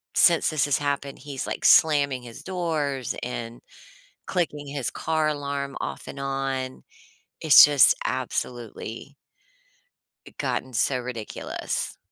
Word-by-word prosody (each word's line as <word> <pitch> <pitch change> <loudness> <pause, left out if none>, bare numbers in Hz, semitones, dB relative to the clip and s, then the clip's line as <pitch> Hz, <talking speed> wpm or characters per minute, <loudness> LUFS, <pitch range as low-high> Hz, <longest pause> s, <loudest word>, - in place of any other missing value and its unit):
since 170 -2 +5
this 155 -3 +1
has 145 - +2
happened, 140 -1 -3
he's, 140 -3 -6
like, - - -4
slamming 140 -5 +4
his 120 +4 -11
doors 155 -8 -2
and 120 -1 -5 0.7
clicking 150 -5 -2
his 140 -3 -3
car 160 -1 -1
alarm 140 -2 -3
off - - -5
and 140 - -8
on. 135 -1 -3 0.6
It's 155 -2 +9
just 145 -3 +6
absolutely 120 +2 -4 1.1
I - - -12
gotten 130 - -3
so 130 +2 +1
ridiculous. 120 -3 -5
140 Hz, 120 wpm, -25 LUFS, 130-150 Hz, 1.1 s, It's